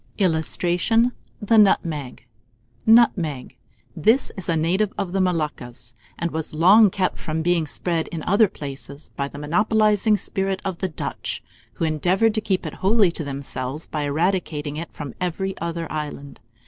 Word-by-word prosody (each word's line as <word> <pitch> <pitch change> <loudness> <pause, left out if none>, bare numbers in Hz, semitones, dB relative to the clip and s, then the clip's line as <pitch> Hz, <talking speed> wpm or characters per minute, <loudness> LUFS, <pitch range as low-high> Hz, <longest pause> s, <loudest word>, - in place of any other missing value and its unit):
[Illustration: 180 +6 +2 0.3
THE 225 +1 +2
NUTMEG.] 155 - +1 0.6
NUTMEG. 180 - +3 0.4
This 220 - +2
is 190 -4 -5
a 165 - +2
native 185 +6 +1
of 195 -4 -2
the 195 +1 +1
Moluccas, 150 -9 -3 0.2
and 170 0 -2
was 160 -1 -4
long 195 +7 +7
kept 185 0 -1
from 160 -1 -3
being 170 -2 +1
spread 165 +2 -2
in 160 -3 -6
other 205 +3 +4
places 140 -2 -8
by 140 - -2
the 145 - -11
monopolizing 210 +6 +2
spirit 195 -1 -2
of 190 -3 -3
the 190 - -1
Dutch, 155 - -5 0.3
who 165 - -2
endeavoured 180 +8 +2
to 220 - -1
keep 190 -4 -1
it 155 - -5
wholly 200 -1 +4
to 165 - -3
themselves 140 +1 -4
by 150 -2 -3
eradicating 155 -1 -1
it 165 +2 -6
from 145 -4 -7
every 190 +2 -2
other 170 0 -3
island. 150 -2 -6
170 Hz, 155 wpm, -23 LUFS, 150-195 Hz, 0.6 s, long